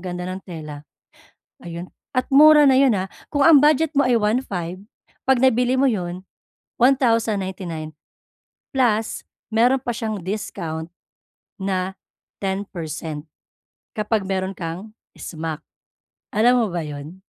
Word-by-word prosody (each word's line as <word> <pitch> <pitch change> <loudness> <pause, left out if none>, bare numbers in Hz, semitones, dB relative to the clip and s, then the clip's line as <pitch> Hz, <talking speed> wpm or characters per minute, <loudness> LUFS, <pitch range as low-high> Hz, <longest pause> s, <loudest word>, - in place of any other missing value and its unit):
ganda 180 -1 -5
ng 185 - -4
tela. 155 -4 -8 0.7
Ayun 170 +1 -8 0.3
at 255 - +2
mura 300 +1 +8
na 265 -2 +5
'yon, 265 -4 +5
ah, 190 0 -3 0.2
kung 285 -2 0
ang 320 -2 +8
budget 305 +2 +3
mo 280 -3 +3
ay 250 - +3
1,500, 210 -6 -1 0.5
'pag 265 -1 +5
nabili 250 0 +3
mo 270 0 +3
'yon 180 -3 -4 0.5
1,099 200 - +1 0.8
plus 225 -4 +1 0.3
mayro'n 245 +4 +4
pa 245 -2 -3
siyang 220 -3 -3
discount 170 -5 -4 0.7
na 190 -1 -2 0.5
10% 165 -6 -4 0.7
kapag 210 -2 0
mayro'n 190 0 -2
kang 180 +4 -6 0.3
smack 160 -1 -5 0.7
alam 245 +4 +5
mo - - -2
ba 170 -2 -2
'yon? 150 +5 -8
195 Hz, 120 wpm, -22 LUFS, 175-250 Hz, 0.8 s, mura